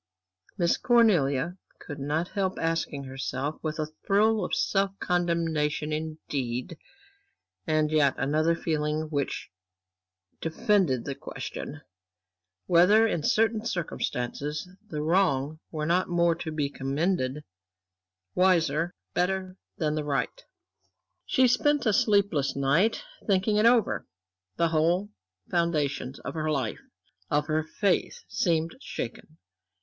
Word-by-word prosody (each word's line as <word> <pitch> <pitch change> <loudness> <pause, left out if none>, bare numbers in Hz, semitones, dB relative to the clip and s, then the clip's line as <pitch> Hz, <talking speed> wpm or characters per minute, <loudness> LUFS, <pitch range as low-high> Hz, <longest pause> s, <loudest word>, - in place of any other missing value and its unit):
Miss 170 -2 +2
Cornelia 175 - +3 0.2
could 145 -2 -8
not 150 +5 -1
help 190 -2 -1
asking 165 -4 -1
herself 135 +2 -4
with 155 -1 -3
a 155 - -1 0.2
thrill 215 +2 +3
of - - -1
self 195 0 0
condemnation, 165 -4 0
indeed, 150 -4 -3 0.9
and 155 -1 +2
yet 150 -3 +3
another 155 +4 +2
feeling 155 -1 -1
which 140 -2 -2 0.9
defended 165 - +1
the 140 - -2
question 75 - -7 0.8
whether 180 +6 +6
in 185 -7 0
certain 220 +6 +2
circumstances, 150 - -3 0.2
the 150 -1 -3
wrong 155 -4 +1
were 155 -2 -3
not 175 +3 +1
more 170 -1 +3
to 165 -1 -5
be 150 -2 0
commended, 140 +1 -1 0.9
wiser, 170 -3 +2 0.2
better 185 +1 -1 0.2
than 150 -2 0
the 155 -1 -1
right. 145 - -2 0.8
She 260 -1 +4
spent 290 +3 +2
a 215 - +3
sleepless 200 -10 +2
night, 145 - +2 0.2
thinking 200 +1 +2
it 215 +2 +5
over. 235 -3 +2 0.5
The 170 - +2
whole 170 +6 +1 0.4
foundations 150 -6 0
of - - -5
her 155 -1 -2
life, 135 -7 -1 0.5
of 150 0 +1
her 155 0 +1
faith 190 +4 0
seemed 165 -1 0
shaken. 155 - -6
160 Hz, 115 wpm, -27 LUFS, 150-185 Hz, 0.9 s, whether